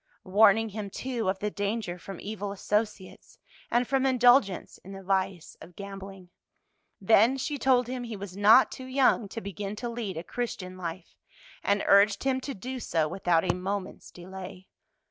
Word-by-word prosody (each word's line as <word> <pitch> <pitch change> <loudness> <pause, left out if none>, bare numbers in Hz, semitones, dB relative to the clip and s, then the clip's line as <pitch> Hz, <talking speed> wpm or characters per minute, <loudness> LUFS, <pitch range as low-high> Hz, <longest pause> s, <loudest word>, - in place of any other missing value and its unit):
Warning 215 +3 +4
him, 210 -1 -6
too, 235 -1 -3
of 190 - 0
the 210 +2 -3
danger 200 -3 -3
from 190 +1 -9
evil 205 -1 -5
associates 210 0 -3 0.3
and 240 +1 +1
from 270 -1 +1
indulgence 245 -6 +3
in 195 - -11
the 195 0 -9
vice 190 -2 -1
of 175 - -13
gambling. 195 -2 -9 0.7
Then 225 +6 +4
she 285 +2 -3
told 250 0 +3
him 250 0 -5
he 230 -2 -6
was 195 -2 -8
not 215 +6 +6
too 260 - -8
young 260 -5 +2
to 225 - -6
begin 200 +1 -5
to 240 +3 -5
lead 230 -7 -5
a 165 - -4
Christian 185 -5 -5
life, 175 0 -7 0.5
and 200 0 +1
urged 200 0 +5
him 265 -1 0
to 275 +1 -5
do 255 +6 -6
so 165 -8 0
without 175 -1 +1
a 180 - +1
moment's 190 +2 -5
delay. 185 +1 -10
200 Hz, 170 wpm, -28 LUFS, 190-235 Hz, 0.7 s, not